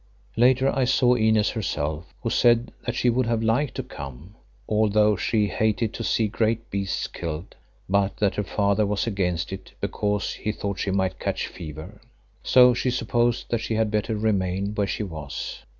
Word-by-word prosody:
Later 130 +3 +4
I 135 -1 +2
saw 125 -1 +4
Inez 110 -2 +3
herself, 80 -6 -3
who 115 - -1
said 120 0 +3 0.2
that 120 - -1
she 125 - +1
would 125 0 +1
have 115 -1 0
liked 120 +6 +1
to 130 - -3
come, 70 - -9 0.3
although 105 0 +3
she 105 +3 +1
hated 110 +2 0
to 115 - -5
see 110 -1 +1
great 115 +2 -1
beasts 100 -1 -2
killed, 80 +1 -6 0.3
but 100 0 +1
that 100 -2 +1
her 105 - -1
father 100 +1 +1
was 100 -2 0
against 90 -5 -1
it 95 - -9
because 105 -1 -1
he 105 - -3
thought 100 -3 -4
she - - -1
might 95 -1 0
catch - - -2
fever. 80 -3 -9 0.4
So 125 -1 +6
she 125 +1 0
supposed 120 0 0
that 120 - +1
she 110 - -2
had 110 -1 +1
better 105 +1 0
remain 100 -2 0
where 105 -1 0
she 105 - -2
was. 80 -7 -6
105 Hz, 180 wpm, -25 LUFS, 95-115 Hz, 0.4 s, So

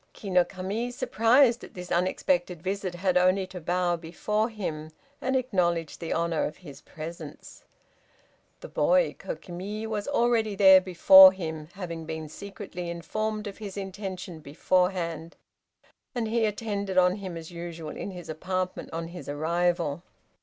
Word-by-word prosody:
Ki 200 - -7
no 180 -1 +5
Kami 195 +6 -4
surprised 240 +1 +3
at - - -12
this 180 -1 -8
unexpected 175 -1 0
visit, 190 -1 -3
had 180 0 +1
only 185 +1 +3
to 185 -1 -9
bow 175 +1 +1
before 210 +7 -1
him, 160 -8 -5 0.3
and 265 +1 0
acknowledge 180 - 0
the 165 - -5
honor 170 -1 0
of 150 - -5
his 145 -7 -12
presence. 160 +2 -9 1.0
The - - -7
boy, - - +2
Kokimi, 205 - -6
was 215 -2 -3
already 235 -6 +2
there 190 -1 +8
before 190 +1 +9
him, 160 -5 -6
having 170 -4 -6
been 160 -1 -5
secretly 190 -1 -7
informed 215 +6 -3
of 205 0 -7
his 205 -2 -7
intention 190 -3 -6
beforehand, 170 +2 -1 0.8
and 235 -2 -1
he 225 0 +1
attended 205 -3 -2
on 180 +1 +4
him 190 -4 -6
as 165 +1 -9
usual 170 -2 -7
in - - -5
his 180 -3 -9
apartment 185 +3 -3
on 165 0 -4
his 175 -3 -9
arrival. 170 +1 0
185 Hz, 145 wpm, -27 LUFS, 170-205 Hz, 1.0 s, before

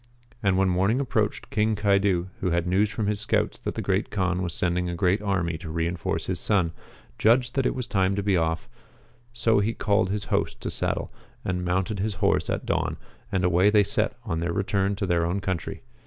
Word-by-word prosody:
And 95 -3 +2
when 95 0 +3
morning 95 +7 +2
approached, 110 -6 -1
King 110 +1 +2
Caidu, 100 -3 +2
who 95 - 0
had 85 0 +1
news 95 +4 +2
from 110 0 -2
his 105 0 0
scouts 105 - 0
that - - -4
the - - -3
Great - - 0
Kaan 90 -2 0
was 90 -2 -2
sending 90 +1 0
a 85 - -3
great 95 +3 +2
army 90 -5 -1
to 85 -2 -7
reinforce 85 +2 -2
his - - -2
son, 95 -6 +1 0.5
judged 120 +2 +3
that 135 -2 +1
it - - -1
was 125 -2 -3
time 95 -4 +1
to 100 - -1
be 100 -1 +2
off; 80 -1 0 0.6
so 115 -2 +2
he 110 +3 0
called 100 -2 +1
his 100 +1 -2
host - - 0
to - - -3
saddle - - -2 0.3
and 90 -1 -1
mounted 95 +3 -1
his 105 +1 -1
horse - - +1
at - - -2
dawn, - - -1 0.3
and 95 -1 0
away 90 +3 +4
they 105 -1 +5
set - - 0
on 80 - -2
their 85 +1 -1
return 100 +1 0
to 100 - -2
their 85 -2 +1
own 85 +4 0
country. 95 -3 -4
95 Hz, 215 wpm, -26 LUFS, 90-105 Hz, 0.6 s, they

